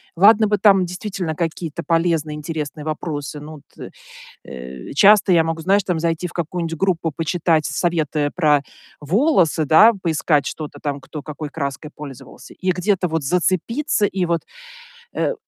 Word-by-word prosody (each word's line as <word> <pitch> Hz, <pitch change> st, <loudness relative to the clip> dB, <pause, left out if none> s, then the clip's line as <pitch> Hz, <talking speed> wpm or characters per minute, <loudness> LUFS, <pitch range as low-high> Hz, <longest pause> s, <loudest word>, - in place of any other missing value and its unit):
Ладно 210 Hz, +4 st, +6 dB
бы 210 Hz, 0 st, +1 dB
там 195 Hz, -3 st, +5 dB
действительно 180 Hz, -2 st, -4 dB
какие-то 165 Hz, 0 st, -4 dB
полезные, 165 Hz, -3 st, 0 dB
интересные 150 Hz, -1 st, -5 dB
вопросы. 150 Hz, -1 st, -4 dB
Ну, 155 Hz, +2 st, -10 dB
вот, 145 Hz, -, -13 dB, 0.2 s
э, -, -, -8 dB, 0.5 s
э, 65 Hz, 0 st, -9 dB
часто 200 Hz, +4 st, +5 dB
я 165 Hz, -2 st, +5 dB
могу, 165 Hz, 0 st, -3 dB
знаешь, 195 Hz, +3 st, +2 dB
там 175 Hz, -4 st, -1 dB
зайти 165 Hz, +1 st, -1 dB
в -, -, -13 dB
какую-нибудь 165 Hz, -1 st, -3 dB
группу, 170 Hz, -4 st, 0 dB
почитать 165 Hz, -1 st, +1 dB
советы 155 Hz, -4 st, -1 dB
про 150 Hz, -5 st, +3 dB, 0.4 s
волосы, 175 Hz, -, +2 dB
да, 215 Hz, +10 st, +7 dB
поискать 155 Hz, -4 st, +1 dB
что-то 150 Hz, -2 st, -7 dB
там, 145 Hz, -2 st, -3 dB
кто 150 Hz, +2 st, -8 dB
какой 150 Hz, 0 st, -7 dB
краской 145 Hz, 0 st, -5 dB
пользовался, 140 Hz, -4 st, -11 dB
и 185 Hz, 0 st, -1 dB
где-то 185 Hz, 0 st, 0 dB
вот 160 Hz, -2 st, -2 dB
зацепиться, 190 Hz, -, 0 dB
и 185 Hz, -2 st, -1 dB
вот, 170 Hz, -1 st, 0 dB, 0.7 s
э, -, -, 0 dB
165 Hz, 155 wpm, -20 LUFS, 150-185 Hz, 0.7 s, да